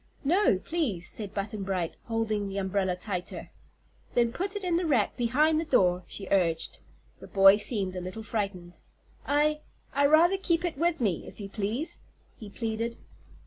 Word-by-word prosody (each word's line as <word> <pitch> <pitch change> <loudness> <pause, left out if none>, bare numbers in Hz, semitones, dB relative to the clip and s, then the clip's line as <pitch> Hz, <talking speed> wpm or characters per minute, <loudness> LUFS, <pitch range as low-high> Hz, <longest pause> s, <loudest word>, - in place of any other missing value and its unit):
"No, 340 - +3
please," 215 - -2
said 205 -3 -4
Button 205 +1 -4
Bright, 185 -4 -2
holding 220 -3 -1
the 195 - -5
umbrella 190 -1 0
tighter. 180 -1 -5 0.6
"Then 235 -1 +3
put 390 +7 -3
it 410 - -4
in 355 -2 +1
the 345 0 +1
rack 255 -9 +2
behind 295 +6 +2
the - - 0
door," 180 - +2
she 195 - -8
urged. 170 -4 +1 0.4
The - - -11
boy 195 0 +7
seemed 205 -4 -2
a 180 - -3
little 185 +5 -6
frightened. 195 -5 -4 0.5
"I 300 +1 +2 0.3
I'd 280 +1 +4
rather 340 +5 +5
keep 340 -2 +1
it 340 - -2
with 335 +1 0
me, 195 -8 0
if - - -12
you 200 -1 -6
please," 220 - -3 0.4
he 215 -4 -10
pleaded. 230 +2 -3
220 Hz, 170 wpm, -28 LUFS, 195-300 Hz, 0.6 s, boy